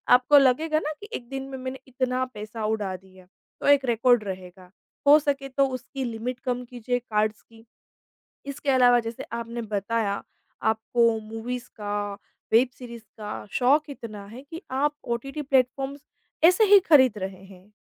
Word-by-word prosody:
आपको 255 +4 +5
लगेगा 310 +4 +3
ना 310 - -3
कि 415 - -9
1 240 - -15
दिन 270 0 -4
में 265 - -6
मैंने 260 +1 -6
इतना 255 0 -1
पैसा 215 +1 -7
उड़ा 210 -3 -1
दिया, 185 0 -19 0.4
तो - - -2
एक 285 -2 +5
रिकॉर्ड 240 -1 +3
रहेगा। 185 -1 -8 0.4
हो 295 - +9
सके 275 -2 -2
तो 275 +1 +2
उसकी 260 +1 -5
लिमिट 240 +2 -4
कम 250 0 -1
कीजिए 245 0 -3
कार्ड्स 215 -2 -1
की, 225 0 -20 0.8
इसके 280 0 -4
अलावा 245 -2 +5
जैसे 230 0 -5
आपने 235 0 -5
बताया 200 0 -1 0.4
आपको 225 +1 +2
मूवीज़ 230 +3 -6
का, 205 0 -3 0.4
वेब 245 +3 +5
सीरीज़ 235 -3 -9 0.2
का 210 0 -6
शौक 290 +5 +3
इतना 215 -7 -8
है 230 +5 -10
कि 325 +5 -9
आप 290 +3 +1
ओ 235 - -1
टी 275 - -7
टी 305 - -4
प्लेटफॉर्म्स 270 +1 0 0.5
ऐसे 370 +5 +3
ही 405 - +10
खरीद 260 -8 +6
रहे 190 0 -6
हैं। 185 0 -16
245 Hz, 170 wpm, -25 LUFS, 215-270 Hz, 0.8 s, ही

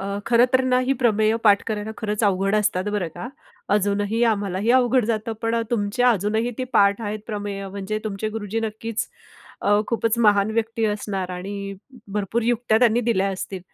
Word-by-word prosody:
अ, 200 +1 -3
खरं 235 +1 +5
तर 260 0 +4
ना 250 -1 +3
ही - - +4
प्रमेय 220 -1 +3
पाठ 205 -2 +5
करायला 210 0 -3
खरंच 210 0 -2
अवघड 195 0 +1
असतात, 200 -3 +1
बरं 195 -5 -1
का. 240 - -6 0.4
अजूनही 205 +2 +1
आम्हालाही 205 -1 0
अवघड 250 -1 +2
जातं. 225 0 -1
पण 225 0 0
अ, 230 - +1
तुमच्या 235 +2 +2
अजूनही 220 +2 0
ती 255 - -1
पाठ 200 +1 +4
आहेत 215 0 -3
प्रमेय, 205 -2 -4
म्हणजे 200 +2 -4
तुमचे 215 0 -3
गुरुजी 215 0 -3
नक्कीच 220 0 -3 0.5
अ, - - +1 0.2
खूपच 230 -1 0
महान 210 -2 +4
व्यक्ती 225 0 -1
असणार 205 -3 -3
आणि 195 +2 -5 0.4
भरपूर 210 +3 -1
युक्त्या 235 -1 +2
त्यांनी 235 -1 +4
दिल्या 195 -3 +1
असतील. 190 0 -5
215 Hz, 175 wpm, -23 LUFS, 200-230 Hz, 0.5 s, खरं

